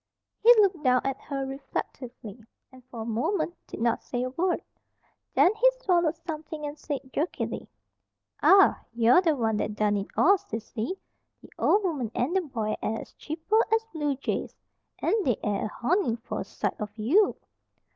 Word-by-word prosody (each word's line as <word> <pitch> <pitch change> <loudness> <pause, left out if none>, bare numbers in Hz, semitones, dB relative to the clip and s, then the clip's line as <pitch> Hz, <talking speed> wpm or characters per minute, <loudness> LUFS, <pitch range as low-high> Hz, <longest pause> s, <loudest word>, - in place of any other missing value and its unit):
He 470 - +8
looked 390 -7 +3
down 255 -1 +4
at 270 0 -2
her 275 -2 -4
reflectively, 255 -4 -6 0.3
and 260 -1 -16
for 235 -3 -7
a - - -7
moment 290 - -1
did - - -8
not 230 0 +1
say 245 -1 -3
a 255 - -3
word. 350 +6 0 0.7
Then 370 - +5
he - - +4
swallowed 345 -7 +2
something 315 -2 -6
and 290 0 -5
said, 285 -3 -6
jerkily: 320 +5 -3 0.7
"An' 390 0 +6 0.2
you're 235 +8 +5
the 325 -4 +2
one 225 -4 0
that 210 0 -2
done 210 -1 +1
it 200 - -3
all, 395 +3 +6
Sissy! 225 - -5 0.5
The - - -15
ol' 420 - +3
woman 290 - -1
an' 255 +8 0
the 380 - +3
boy 225 -9 -3
air 225 +1 -2
as - - -13
chipper 325 +8 -1
as 445 0 +2
bluejays. 290 -4 -2 0.5
An' - - +2
they 245 - +1
air 205 -1 -1
a - - -1
honin' 245 - 0
for 230 - -5
a - - -2
sight - - -4
on 210 - -3
you." 295 - +3
275 Hz, 175 wpm, -27 LUFS, 230-350 Hz, 0.7 s, He